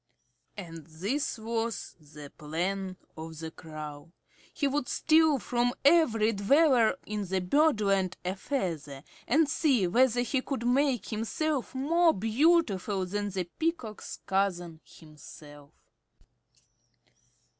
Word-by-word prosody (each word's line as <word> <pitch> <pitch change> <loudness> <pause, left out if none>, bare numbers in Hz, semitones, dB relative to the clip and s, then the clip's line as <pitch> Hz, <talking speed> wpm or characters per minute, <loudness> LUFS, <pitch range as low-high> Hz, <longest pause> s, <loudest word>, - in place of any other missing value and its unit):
And 165 -5 -9
this 200 - -2
was 225 0 -3
the 150 -1 -12
plan 185 +5 -3 0.2
of 160 0 -8
the 160 +1 -6
Crow. 155 -1 -9 0.4
He 295 -4 -1
would 275 -2 -2
steal 315 -2 +3
from 245 0 0
every 260 -9 +4
dweller 245 +3 +3
in 210 -1 -3 0.2
Birdland 200 - +2
a 185 +1 -1
feather, 165 - -4 0.2
and 310 +4 +3
see 275 - +2
whether 245 +6 +3
he 255 +2 0
could 260 -3 -4
not 245 - +3
make 270 -3 +1
himself 260 +6 -2
more 330 +5 +3
beautiful 220 - +2
than 205 +2 -3
the 190 -2 -2
Peacock's 255 - -4
cousin 175 -4 -1
himself. 145 -2 -14
215 Hz, 115 wpm, -29 LUFS, 175-275 Hz, 0.4 s, every